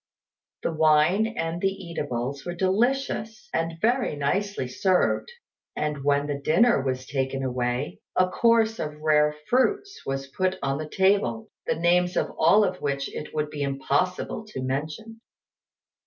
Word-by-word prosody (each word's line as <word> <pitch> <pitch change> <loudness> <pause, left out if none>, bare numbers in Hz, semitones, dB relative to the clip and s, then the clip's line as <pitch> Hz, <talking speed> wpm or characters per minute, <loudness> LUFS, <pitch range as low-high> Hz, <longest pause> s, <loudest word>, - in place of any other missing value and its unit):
The 165 - -1
wine 155 +7 +4
and 170 -6 -3
the 195 - +3
eatables 140 -8 -4
were 175 0 -5
delicious, 220 +3 0
and 165 0 -1
very 240 - +1
nicely 180 +2 -1
served; 185 - +1 0.4
and 150 -2 -2
when 145 0 +2
the 145 -1 -3
dinner 170 - +4
was 130 -1 -2
taken 135 -1 -2
away, 125 +1 -2 0.2
a 185 0 +4
course 225 +2 +3
of 150 0 -4
rare 150 -1 +3
fruits 400 +11 +1
was 135 0 -3
put 185 +7 -1
on 135 +1 0
the 155 -1 -5
table, 190 - +1 0.2
the - - +1
names 180 +2 +2
of - - 0
all 170 +7 +6
of 185 -2 -2
which 140 -1 -2
it 150 - -6
would 150 0 -1
be 150 -1 -5
impossible 140 +9 -1
to 130 -11 -6
mention. 155 +13 -4
160 Hz, 150 wpm, -25 LUFS, 140-195 Hz, 0.4 s, all